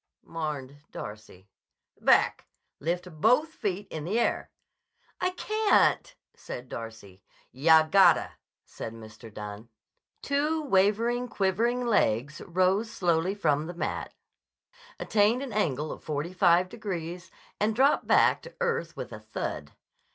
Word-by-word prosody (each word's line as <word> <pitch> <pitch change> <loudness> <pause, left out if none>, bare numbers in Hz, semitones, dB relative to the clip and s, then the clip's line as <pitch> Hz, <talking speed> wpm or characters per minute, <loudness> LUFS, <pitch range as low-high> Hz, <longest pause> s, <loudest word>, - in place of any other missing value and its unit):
mourned 145 -4 -5
Darcy. 105 -3 -9 0.5
"Back. - - +3 0.3
Lift 170 0 -4
both 250 +8 +4
feet 205 - -4
in 155 - -5
the 200 +9 0
air." - - 0 0.7
"I 365 - +1
can't!" 430 +5 +2 0.2
said 125 +1 -8
Darcy. 110 -4 -9 0.3
"Yah 160 +4 +5
gotta!" 195 +4 +5 0.3
said 110 - -8
Mr. 110 0 -12
Dunne. 105 +2 -8 0.5
Two 300 +3 0
wavering, 230 +2 +2
quivering 230 +5 0
legs 145 - +1
rose 185 +5 +1
slowly 175 +1 0
from 155 -5 +1
the 175 - -7
mat, - - -4 0.8
attained 220 +5 +2
an 260 -5 -6
angle 155 -7 -1
of - - -9
forty 155 +3 -3
five 175 0 +4
degrees, 180 -4 -6 0.3
and 215 +1 +1
dropped 270 +4 +3
back - - +4
to - - -13
earth 480 -1 -2
with - - -6
a - - -7
thud. - - -5
180 Hz, 125 wpm, -28 LUFS, 145-230 Hz, 0.8 s, Yah